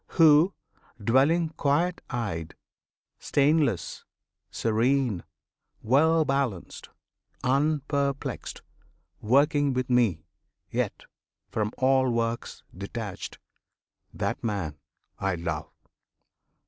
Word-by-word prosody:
Who, 160 Hz, +3 st, +6 dB, 0.4 s
dwelling 140 Hz, +10 st, +3 dB
quiet 160 Hz, +4 st, 0 dB
eyed,[FN#25] 100 Hz, -, -7 dB
Stainless, 145 Hz, -, +1 dB, 0.5 s
serene, 115 Hz, -3 st, +1 dB, 0.6 s
well 155 Hz, +7 st, +4 dB
balanced, 135 Hz, -10 st, -2 dB, 0.5 s
unperplexed, 140 Hz, 0 st, -1 dB, 0.6 s
Working 140 Hz, +4 st, +3 dB
with 130 Hz, 0 st, -2 dB
Me, 105 Hz, -11 st, +2 dB, 0.5 s
yet -, -, -2 dB, 0.5 s
from 105 Hz, -1 st, -1 dB
all 130 Hz, 0 st, +3 dB
works 115 Hz, 0 st, -2 dB
detached, 100 Hz, +1 st, -6 dB, 0.7 s
That -, -, -3 dB
man 95 Hz, -10 st, -3 dB, 0.4 s
I 95 Hz, -1 st, 0 dB
love! 85 Hz, -2 st, -4 dB
130 Hz, 75 wpm, -27 LUFS, 105-145 Hz, 0.7 s, Who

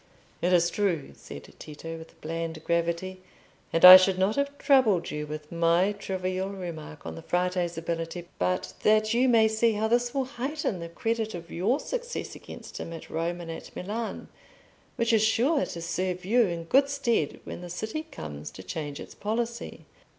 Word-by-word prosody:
"It 180 Hz, -, +2 dB
is 175 Hz, -1 st, +4 dB
true," 175 Hz, -, -1 dB
said -, -, -11 dB
Tito, 165 Hz, +2 st, -8 dB
with 160 Hz, -, -14 dB
bland 165 Hz, 0 st, -4 dB
gravity; 170 Hz, +2 st, -1 dB, 0.5 s
"and 165 Hz, -, +5 dB
I 185 Hz, 0 st, +15 dB
should 185 Hz, 0 st, +2 dB
not 190 Hz, +3 st, +2 dB
have 280 Hz, 0 st, -1 dB
troubled 255 Hz, -, +3 dB
you 150 Hz, 0 st, -4 dB
with 150 Hz, 0 st, -7 dB
my 170 Hz, +3 st, +3 dB
trivial 190 Hz, -1 st, -3 dB
remark 170 Hz, -6 st, -7 dB
on 80 Hz, -, -5 dB
the 80 Hz, -, -8 dB
Frate's 180 Hz, -1 st, -1 dB
ability, 165 Hz, +1 st, -4 dB
but 90 Hz, 0 st, -1 dB
that 215 Hz, +1 st, +3 dB
you 250 Hz, +2 st, +3 dB
may 225 Hz, -2 st, +5 dB
see 220 Hz, +1 st, +2 dB
how 215 Hz, +1 st, 0 dB
this 240 Hz, +1 st, +2 dB
will 270 Hz, 0 st, -1 dB
heighten 265 Hz, -, -3 dB
the 170 Hz, 0 st, -6 dB
credit 225 Hz, +4 st, -2 dB
of 170 Hz, -1 st, -9 dB
your 215 Hz, -, +1 dB
success -, -, -4 dB
against -, -, -10 dB
him 165 Hz, -, -6 dB
at 165 Hz, -, -9 dB
Rome 170 Hz, +2 st, -2 dB
and 165 Hz, -1 st, -6 dB
at 165 Hz, -, -9 dB
Milan, 220 Hz, +5 st, -4 dB, 0.7 s
which 235 Hz, -1 st, +1 dB
is 220 Hz, -, +5 dB
sure 265 Hz, +7 st, +3 dB
to 170 Hz, -, -6 dB
serve 180 Hz, +1 st, -2 dB
you 230 Hz, +2 st, +4 dB
in 170 Hz, -2 st, -4 dB
good 275 Hz, +11 st, +3 dB
stead 235 Hz, -, 0 dB
when -, -, -7 dB
the 175 Hz, -, -8 dB
city 220 Hz, -, -4 dB
comes 75 Hz, -, -8 dB
to 95 Hz, +6 st, -11 dB
change 145 Hz, -, -5 dB
its -, -, -9 dB
policy." 235 Hz, +3 st, -4 dB
185 Hz, 180 wpm, -27 LUFS, 165-225 Hz, 0.7 s, I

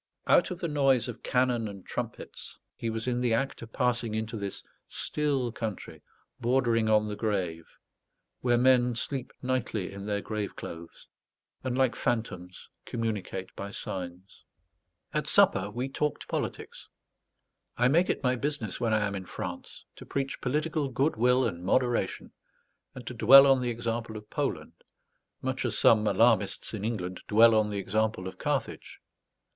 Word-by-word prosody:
Out -, -, +4 dB
of 180 Hz, -, -4 dB
the 170 Hz, -, -2 dB
noise 135 Hz, -5 st, +2 dB
of 120 Hz, -, -7 dB
cannon 125 Hz, -3 st, +1 dB
and 100 Hz, -2 st, -9 dB
trumpets, -, -, -6 dB, 0.2 s
he 115 Hz, -, -3 dB
was 115 Hz, 0 st, -3 dB
in 125 Hz, -1 st, 0 dB
the 120 Hz, -2 st, +2 dB
act 135 Hz, +4 st, -2 dB
of 115 Hz, -1 st, -9 dB
passing 120 Hz, -3 st, 0 dB
into 110 Hz, +1 st, -3 dB
this 100 Hz, -2 st, -4 dB, 0.2 s
still 140 Hz, -5 st, -1 dB
country 110 Hz, -3 st, -6 dB, 0.4 s
bordering 120 Hz, -3 st, +2 dB
on 105 Hz, 0 st, +4 dB
the 105 Hz, -, -4 dB
grave, 95 Hz, -7 st, -3 dB, 0.6 s
where 120 Hz, -1 st, +2 dB
men 125 Hz, -1 st, +4 dB
sleep 130 Hz, +2 st, -3 dB
nightly 125 Hz, -6 st, -1 dB
in 100 Hz, +1 st, -7 dB
their 105 Hz, -1 st, 0 dB
grave 105 Hz, -1 st, -4 dB
clothes, 85 Hz, 0 st, -9 dB, 0.6 s
and, 130 Hz, -1 st, -2 dB
like 130 Hz, -2 st, +3 dB
phantoms, 95 Hz, -7 st, -3 dB, 0.2 s
communicate 105 Hz, -5 st, -4 dB
by 100 Hz, -, -5 dB
signs. 90 Hz, -1 st, -7 dB, 0.7 s
At -, -, -1 dB
supper 95 Hz, +1 st, +4 dB
we 125 Hz, +5 st, -3 dB
talked 150 Hz, +2 st, -2 dB
politics. -, -, -5 dB, 0.9 s
I 125 Hz, -, +4 dB
make 170 Hz, +7 st, +3 dB
it -, -, -1 dB
my 125 Hz, -1 st, +2 dB
business, 140 Hz, -6 st, -3 dB
when 115 Hz, -2 st, +1 dB
I 105 Hz, -1 st, +2 dB
am 100 Hz, -, -3 dB
in 95 Hz, -2 st, -6 dB
France, 90 Hz, -1 st, -7 dB
to -, -, -9 dB
preach 135 Hz, -1 st, -3 dB
political 150 Hz, +2 st, -1 dB
good 135 Hz, +5 st, +1 dB
will 125 Hz, +3 st, +3 dB
and 85 Hz, +1 st, -3 dB
moderation, 120 Hz, +5 st, 0 dB, 0.6 s
and 125 Hz, -, -9 dB
to 125 Hz, -, -5 dB
dwell 130 Hz, +4 st, +9 dB
on 135 Hz, -2 st, +4 dB
the 125 Hz, -, -1 dB
example 115 Hz, -1 st, -3 dB
of 105 Hz, 0 st, -12 dB
Poland, -, -, -3 dB, 0.6 s
much -, -, -2 dB
as -, -, 0 dB
some 110 Hz, -1 st, +5 dB
alarmists 115 Hz, -3 st, +2 dB
in 105 Hz, -2 st, -4 dB
England 95 Hz, -5 st, -3 dB
dwell 115 Hz, +2 st, +6 dB
on 110 Hz, -1 st, +3 dB
the 100 Hz, -, -3 dB
example 105 Hz, -1 st, -1 dB
of 95 Hz, -, -9 dB
Carthage. -, -, -3 dB
115 Hz, 160 wpm, -29 LUFS, 105-125 Hz, 0.9 s, dwell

